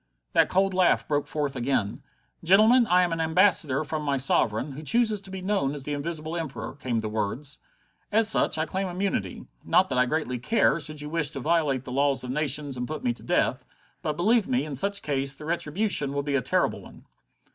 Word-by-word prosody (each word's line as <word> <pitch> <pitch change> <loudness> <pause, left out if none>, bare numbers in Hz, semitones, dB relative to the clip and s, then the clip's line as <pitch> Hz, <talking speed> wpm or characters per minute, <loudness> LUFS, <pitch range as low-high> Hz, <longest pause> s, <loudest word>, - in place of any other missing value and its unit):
That - - +4
cold 195 +1 +1
laugh 185 -1 +2
broke 145 -1 -1
forth 145 -3 -3
again. 120 -5 -1 0.4
"Gentlemen, 220 +7 +5
I 180 -1 +4
am 175 - -1
an 165 0 -1
ambassador 160 -4 +3
from 155 +1 -4
my 140 -2 -1
sovereign, 130 0 +1
who 140 +3 -8
chooses 220 +4 +1
to 195 - -11
be 190 -1 -7
known 185 -8 0
as 140 - -6
the 150 - -4
Invisible 155 +2 -4
Emperor," 160 -7 -5
came 125 -5 -3
the 110 - -4
words. 110 +7 -3 0.5
"As 220 +1 +4
such, 220 - +2
I 160 - 0
claim 190 +3 -3
immunity. 185 +2 -3 0.2
Not 185 +1 +3
that 130 -2 0
I 125 - +3
greatly 140 -4 -2
care, 170 - +2
should 150 0 0
you 150 - -6
wish 165 -4 +2
to 145 -3 -7
violate 150 -3 0
the 125 - -8
laws 140 +1 +1
of 125 - -5
nations 145 -1 -1
and 125 0 -3
put 155 -1 -6
me 120 - +1
to 120 - -16
death. - - 0 0.4
But, 150 -1 -3
believe 215 +4 +2
me, 130 +3 0
in 150 -3 -6
such 200 +8 +1
case 135 -1 -1
the 150 - -10
retribution 165 -2 0
will 140 0 -2
be 140 0 -3
a 140 - +2
terrible - - 0
one." - - -15
150 Hz, 215 wpm, -26 LUFS, 135-180 Hz, 0.5 s, Gentlemen